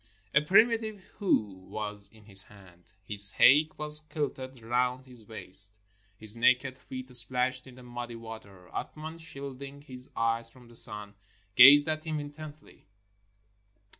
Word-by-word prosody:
A 150 Hz, -, +2 dB
primitive 215 Hz, +3 st, -1 dB
hoe 110 Hz, -, -3 dB, 0.2 s
was 105 Hz, -1 st, -4 dB
in 110 Hz, -2 st, -23 dB
his 95 Hz, -2 st, +5 dB
hand; 95 Hz, -4 st, -22 dB
his 100 Hz, 0 st, +5 dB
haik 150 Hz, +4 st, +1 dB
was 150 Hz, 0 st, +7 dB
kilted 140 Hz, -4 st, -9 dB
round 125 Hz, +2 st, -4 dB
his 120 Hz, -5 st, -18 dB
waist; 100 Hz, -1 st, +5 dB, 0.4 s
his 110 Hz, +1 st, +3 dB
naked 130 Hz, +2 st, -1 dB
feet 130 Hz, 0 st, -13 dB
splashed 125 Hz, +1 st, 0 dB
in 130 Hz, -, -17 dB
the 125 Hz, -, -17 dB
muddy 120 Hz, -1 st, -11 dB
water. 110 Hz, -5 st, -15 dB
Athman, 155 Hz, +2 st, -10 dB
shielding 140 Hz, -2 st, -12 dB
his 130 Hz, -3 st, -3 dB
eyes 115 Hz, 0 st, -3 dB
from 120 Hz, 0 st, -22 dB
the 120 Hz, -, -19 dB
sun, 105 Hz, -3 st, -2 dB, 0.4 s
gazed 140 Hz, +6 st, +5 dB
at 155 Hz, 0 st, -5 dB
him 155 Hz, -1 st, -6 dB
intently. 145 Hz, +1 st, -14 dB
125 Hz, 140 wpm, -25 LUFS, 110-145 Hz, 0.4 s, was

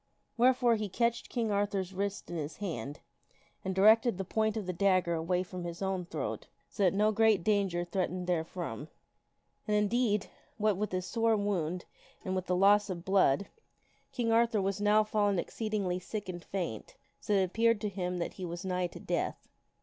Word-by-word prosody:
Wherefore 245 Hz, -1 st, +4 dB
he 210 Hz, -1 st, -3 dB
catched 235 Hz, +4 st, 0 dB
King 230 Hz, -3 st, -1 dB
Arthur's 200 Hz, -2 st, -1 dB
wrist 200 Hz, -1 st, -3 dB
in -, -, -4 dB
his 155 Hz, -1 st, -4 dB
hand 150 Hz, -, -5 dB, 0.6 s
and 190 Hz, 0 st, -2 dB
directed 220 Hz, +2 st, +5 dB
the 195 Hz, -, -3 dB
point 220 Hz, +3 st, 0 dB
of 210 Hz, -, -3 dB
the 185 Hz, -, -3 dB
dag 185 Hz, 0 st, +3 dB
ger 170 Hz, -, -1 dB
away 175 Hz, +2 st, 0 dB
from 180 Hz, -1 st, -7 dB
his 170 Hz, 0 st, -6 dB
own 190 Hz, -2 st, -2 dB
throat -, -, -4 dB, 0.2 s
so -, -, -5 dB
that 190 Hz, -1 st, +4 dB
no 210 Hz, +2 st, +3 dB
great 215 Hz, -4 st, +3 dB
danger 195 Hz, -4 st, +1 dB
threatened 180 Hz, 0 st, -2 dB
there 175 Hz, -3 st, +1 dB
from. 160 Hz, -5 st, -6 dB, 0.8 s
And, 210 Hz, 0 st, +2 dB
indeed, 210 Hz, 0 st, +1 dB, 0.3 s
what 215 Hz, -2 st, +2 dB
with 210 Hz, +3 st, -2 dB
his 185 Hz, -1 st, -2 dB
sore 225 Hz, 0 st, +2 dB
wound 180 Hz, -4 st, -1 dB, 0.4 s
and 185 Hz, -, -2 dB
with 185 Hz, -1 st, -3 dB
the 180 Hz, -, +1 dB
loss 200 Hz, +2 st, +5 dB
of 175 Hz, -1 st, -5 dB
blood, 190 Hz, -3 st, +3 dB, 0.6 s
King 240 Hz, -4 st, -1 dB
Arthur 230 Hz, -1 st, +3 dB
was 195 Hz, +1 st, -1 dB
now 210 Hz, +1 st, +4 dB
fallen 205 Hz, -2 st, +1 dB
exceedingly 200 Hz, -1 st, -2 dB
sick 205 Hz, +2 st, -6 dB
and 175 Hz, -2 st, -6 dB
faint, 170 Hz, -, -5 dB, 0.2 s
so 210 Hz, -, -2 dB
that 195 Hz, -, +4 dB
it -, -, +3 dB
appeared 230 Hz, +4 st, +2 dB
to 210 Hz, -, -1 dB
him 180 Hz, -2 st, -3 dB
that 170 Hz, -, -3 dB
he 190 Hz, -, -8 dB
was 175 Hz, +1 st, -5 dB
nigh 180 Hz, -1 st, 0 dB
to -, -, -11 dB
death. -, -, -3 dB
195 Hz, 195 wpm, -31 LUFS, 180-215 Hz, 0.8 s, directed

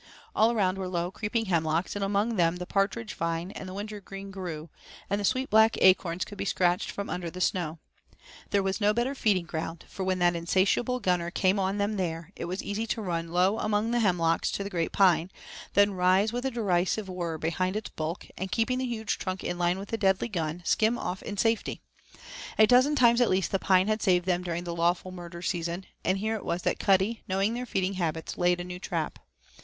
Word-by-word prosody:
All 220 Hz, +2 st, +4 dB
around 195 Hz, -4 st, +1 dB
were 190 Hz, -, -3 dB
low, 175 Hz, 0 st, -2 dB
creeping 220 Hz, +3 st, -2 dB
hemlocks, 165 Hz, -1 st, 0 dB
and 205 Hz, -, -2 dB
among 205 Hz, +3 st, +1 dB
them 170 Hz, -2 st, +2 dB
the 180 Hz, 0 st, -5 dB
partridge 200 Hz, +3 st, -1 dB
vine 165 Hz, +2 st, -2 dB
and 190 Hz, -, -7 dB
the -, -, -7 dB
wintergreen 200 Hz, -1 st, -7 dB
grew, 170 Hz, -5 st, -6 dB, 0.4 s
and 200 Hz, +1 st, +1 dB
the -, -, -3 dB
sweet 260 Hz, +5 st, 0 dB
black 220 Hz, +1 st, +5 dB
acorns 185 Hz, -2 st, +4 dB
could 205 Hz, -, -11 dB
be -, -, -1 dB
scratched 180 Hz, -2 st, +1 dB
from 200 Hz, -, -4 dB
under 175 Hz, -1 st, -3 dB
the 180 Hz, -, -8 dB
snow. 175 Hz, -3 st, 0 dB, 0.7 s
There 200 Hz, -1 st, +2 dB
was 195 Hz, +3 st, -1 dB
no 210 Hz, +1 st, +3 dB
better 240 Hz, +3 st, 0 dB
feeding 205 Hz, -9 st, +1 dB
ground, 165 Hz, 0 st, -5 dB
for 190 Hz, -, -5 dB
when 185 Hz, 0 st, 0 dB
that 175 Hz, -1 st, +3 dB
insatiable 195 Hz, +8 st, +1 dB
gunner 180 Hz, -3 st, +1 dB
came 190 Hz, +2 st, +2 dB
on 195 Hz, +1 st, 0 dB
them 205 Hz, +1 st, 0 dB
there 170 Hz, -1 st, -3 dB
it -, -, -5 dB
was 180 Hz, +3 st, -4 dB
easy 215 Hz, +3 st, -3 dB
to 225 Hz, -, -2 dB
run 170 Hz, -3 st, -2 dB
low 185 Hz, +5 st, +2 dB
among 215 Hz, +2 st, 0 dB
the 240 Hz, -, +2 dB
hemlocks 175 Hz, -6 st, +2 dB
to 200 Hz, -, -2 dB
the 200 Hz, -, -6 dB
great 170 Hz, -3 st, -1 dB
pine, 185 Hz, -3 st, +4 dB, 0.5 s
then 205 Hz, 0 st, +5 dB
rise 185 Hz, +4 st, +3 dB
with 245 Hz, +2 st, -1 dB
a -, -, +1 dB
derisive 200 Hz, -3 st, 0 dB
whirr 175 Hz, -3 st, -3 dB
behind 175 Hz, +4 st, -1 dB
its 215 Hz, -, -4 dB
bulk, 160 Hz, +3 st, -4 dB
and 190 Hz, 0 st, -5 dB
keeping 245 Hz, +4 st, +1 dB
the 260 Hz, -, -1 dB
huge 220 Hz, -3 st, -2 dB
trunk 185 Hz, 0 st, -4 dB
in 175 Hz, -, -3 dB
line 175 Hz, +1 st, +2 dB
with 195 Hz, +1 st, -7 dB
the 225 Hz, -, -2 dB
deadly 195 Hz, +3 st, +2 dB
gun, 170 Hz, -3 st, -3 dB
skim 225 Hz, +2 st, +2 dB
off 180 Hz, -3 st, -4 dB
in 205 Hz, -, -6 dB
safety. 225 Hz, +2 st, 0 dB, 0.8 s
A 215 Hz, -, +8 dB
dozen 255 Hz, +6 st, +5 dB
times 240 Hz, -2 st, +5 dB
at 245 Hz, -, +4 dB
least 185 Hz, 0 st, +1 dB
the 195 Hz, -, +1 dB
pine 185 Hz, 0 st, +3 dB
had 215 Hz, 0 st, 0 dB
saved 180 Hz, -2 st, +3 dB
them 180 Hz, -1 st, +1 dB
during 175 Hz, -1 st, -3 dB
the 170 Hz, -1 st, -4 dB
lawful 175 Hz, +2 st, +1 dB
murder 175 Hz, -1 st, -8 dB
season, 175 Hz, +1 st, -2 dB, 0.2 s
and 185 Hz, -, +1 dB
here 215 Hz, +3 st, -1 dB
it 220 Hz, -, -4 dB
was 170 Hz, +1 st, -2 dB
that -, -, 0 dB
Cuddy, 195 Hz, +3 st, +2 dB
knowing 195 Hz, +3 st, +1 dB
their 245 Hz, +1 st, -4 dB
feeding 190 Hz, -2 st, 0 dB
habits, 165 Hz, -3 st, -3 dB
laid 175 Hz, 0 st, +2 dB
a -, -, -3 dB
new 180 Hz, 0 st, -7 dB
trap. 170 Hz, -4 st, -3 dB
190 Hz, 220 wpm, -28 LUFS, 175-210 Hz, 0.8 s, A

